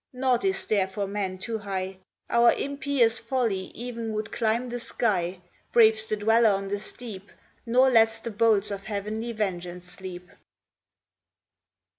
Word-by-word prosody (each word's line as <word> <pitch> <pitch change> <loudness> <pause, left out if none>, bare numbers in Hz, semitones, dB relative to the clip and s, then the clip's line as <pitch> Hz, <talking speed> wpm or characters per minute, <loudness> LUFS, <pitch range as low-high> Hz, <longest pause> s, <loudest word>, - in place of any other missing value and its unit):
Nought 255 -1 +1
is 385 0 0
there 200 -3 +2
for 200 +1 -3
man 195 -2 -3
too 225 +4 -4
high; 190 -2 -4 0.3
Our 235 0 +5
impious 275 -5 +1
folly 230 -6 -1
e'en 230 -2 -4
would 215 +1 -3
climb 230 +2 0
the 245 0 -4
sky, 185 -7 -1 0.3
Braves 220 -1 +5
the 215 - +1
dweller 225 +2 +4
on 195 -1 -1
the 205 0 -2
steep, 205 -2 -10 0.4
Nor 255 +3 +5
lets 225 -1 +4
the 230 - -6
bolts 210 -1 +2
of 200 -1 -5
heavenly 215 +2 -3
vengeance 180 -5 -3
sleep. 180 0 -10
220 Hz, 145 wpm, -26 LUFS, 195-235 Hz, 0.4 s, Our